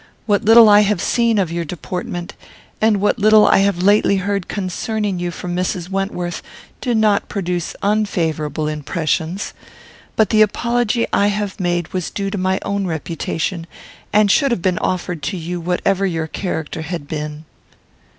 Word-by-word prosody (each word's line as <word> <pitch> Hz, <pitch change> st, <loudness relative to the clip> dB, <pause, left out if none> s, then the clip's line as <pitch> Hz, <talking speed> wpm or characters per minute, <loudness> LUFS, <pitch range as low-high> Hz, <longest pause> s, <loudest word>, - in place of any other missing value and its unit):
What 205 Hz, -2 st, +1 dB
little 225 Hz, +1 st, +8 dB
I 205 Hz, 0 st, +7 dB
have 210 Hz, -2 st, +2 dB
seen 230 Hz, +3 st, +1 dB
of 185 Hz, -5 st, +1 dB
your 170 Hz, 0 st, -2 dB
deportment, 175 Hz, +2 st, -5 dB, 0.5 s
and 215 Hz, -2 st, +3 dB
what 205 Hz, +3 st, +1 dB
little 215 Hz, +1 st, +6 dB
I -, -, +5 dB
have 195 Hz, -2 st, +1 dB
lately 205 Hz, 0 st, +4 dB
heard 200 Hz, -1 st, -2 dB
concerning 205 Hz, 0 st, -2 dB
you 175 Hz, 0 st, -2 dB
from 175 Hz, +1 st, -5 dB
Mrs. 180 Hz, -1 st, -2 dB
Wentworth, 195 Hz, -3 st, -3 dB, 0.4 s
do 245 Hz, -3 st, 0 dB
not 215 Hz, -2 st, +2 dB
produce 180 Hz, -3 st, -3 dB
unfavourable 165 Hz, -8 st, 0 dB
impressions; 160 Hz, +4 st, -2 dB, 0.6 s
but 220 Hz, -, +2 dB
the 215 Hz, -1 st, +4 dB
apology 235 Hz, +2 st, +1 dB
I 200 Hz, -, +3 dB
have 205 Hz, -1 st, -2 dB
made 175 Hz, -2 st, -1 dB
was 185 Hz, -3 st, -2 dB
due 195 Hz, -1 st, -3 dB
to 205 Hz, -, -3 dB
my 185 Hz, +1 st, +1 dB
own 200 Hz, -1 st, -1 dB
reputation, 165 Hz, +1 st, -3 dB, 0.4 s
and 210 Hz, -1 st, +4 dB
should 280 Hz, +5 st, +3 dB
have 235 Hz, -9 st, -1 dB
been 185 Hz, -2 st, +1 dB
offered 180 Hz, -3 st, -2 dB
to 160 Hz, +6 st, -3 dB
you 175 Hz, +1 st, -4 dB
whatever 180 Hz, +3 st, 0 dB
your 165 Hz, -3 st, -2 dB
character 160 Hz, -2 st, -4 dB
had 160 Hz, -2 st, -5 dB
been." 150 Hz, 0 st, -5 dB
185 Hz, 160 wpm, -19 LUFS, 170-205 Hz, 0.6 s, little